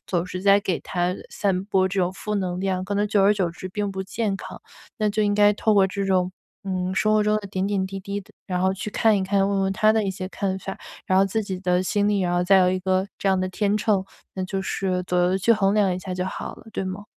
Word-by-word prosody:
总 175 -1 -1
是 185 0 -6
在 200 0 +6
给 195 -4 -2
他 180 0 -1 0.2
散 190 -2 -1
播 190 -2 +2
这 190 +1 -1
种 180 +1 0
负 210 +2 -4
能 185 -3 -2
量， 185 -1 -1
可 200 +2 -3
能 205 +1 +2
久 205 -1 +2
而 200 +1 +6
久 195 -4 0
之 185 +2 -7
并 205 +1 -3
不 190 0 -3
健 195 +1 -2
康。 - - -9 0.4
那 215 -1 +2
就 215 +1 0
应 205 -1 +2
该 205 0 +5
透 215 +1 +1
过 195 -1 +5
这 200 +1 -3
种， 185 -1 +1 0.3
嗯， 185 -1 -2
生 215 +2 +2
活 215 - +4
中 210 0 +2
的 210 -1 -4
点 190 -1 -2
点 200 -2 0
滴 195 0 -6
滴 200 +1 -4
的 195 - -19
然 180 -2 -2
后 190 +1 +2
去 195 +3 -5
看 220 +1 +3
一 195 - 0
看， 195 0 +2
问 200 -1 0
问 195 0 +1
他 215 +2 +4
的 220 0 +2
一 195 - 0
些 185 0 -5
看 190 -1 -2
法。 195 0 -6 0.3
然 185 0 +3
后 195 - +5
自 220 +3 -1
己 190 -3 -5
的 180 -1 +1
心 205 +2 +1
里， 205 -1 +1
然 175 -1 0
后 175 - +2
再 190 +2 +5
有 180 -1 +4
一 185 - 0
个 185 +1 +1
这 195 - 0
样 190 -1 +3
的 185 0 -1
天 205 +2 0
秤， 205 -2 +1 0.3
那 190 - -3
就 195 +1 -3
是 185 -1 -1
左 180 0 0
右 180 +1 +2
去 230 +5 +4
衡 200 -3 +2
量 200 -3 +3
一 - - -4
下 185 0 -6
就 180 0 -2
好 - - -5
了， - - -16
对 - - -2
吗？ 190 +2 -5
195 Hz, 305 characters per minute, -24 LUFS, 185-205 Hz, 0.4 s, 在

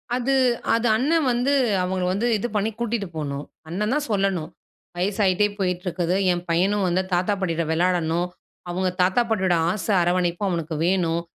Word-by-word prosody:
அது, 255 +2 0 0.4
அது 230 +1 +1
அண்ணன் 300 +3 +2
வந்து 245 +4 +1 0.3
அவங்கள 185 0 -1
வந்து 215 +5 0
இது 240 - -2
பண்ணி 210 +2 +1
கூட்டிட்டு 235 -3 -2
போணும். 145 -1 -4 0.2
அண்ணன் 210 +7 -1
தான் 295 0 -1
சொல்லணும். 195 -5 0 0.5
வயசாயிட்டே 195 +1 +2
போயிட்டு 180 -2 -1
இருக்குது, 175 0 0 0.2
என் 175 0 -2
பையனும் 190 +4 +2
வந்து 180 +1 +1
தாத்தா, 180 +4 +2
பாட்டிட்ட 170 -3 0
விளையாடணும், 170 0 +1 0.4
அவங்க 185 +1 0
தாத்தா 185 +6 +3
பாட்டியோட 190 -5 +2 0.2
ஆசை 210 +2 -1
அரவணைப்பும் 175 +2 0
அவனுக்கு 165 -2 -3
வேணும். 170 -3 +1
185 Hz, 155 wpm, -23 LUFS, 175-210 Hz, 0.5 s, தாத்தா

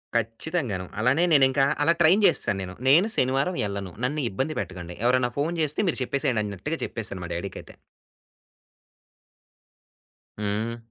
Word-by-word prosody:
కచ్చితంగాను. 115 - -2
అలానే 130 +9 +3
నేనింకా 135 -1 +4 0.2
అలా 165 +2 +4
ట్రైన్ 185 +6 +5
చేసేసాను 95 -2 +3
నేను. 90 0 -8
నేను 170 +10 +6
శనివారం 135 +7 +1
ఎళ్ళను, 100 -3 -5
నన్ను 150 +3 -1
ఇబ్బంది 135 +10 -3
పెట్టకండి. 90 -2 -8
ఎవరన్నా 125 -1 +2
ఫోను 160 +4 -1
చేస్తే 150 0 0
మీరు 145 - -2
చెప్పేసేయండి 125 -5 0
అన్నట్టుగా 100 - -4
చెప్పేసాను 105 -5 -5
మా 85 - -8
డ్యాడీకయితే. 90 +3 -7 2.6
హ్మ్. 110 +3 -2
125 Hz, 125 wpm, -25 LUFS, 100-150 Hz, 2.6 s, నేను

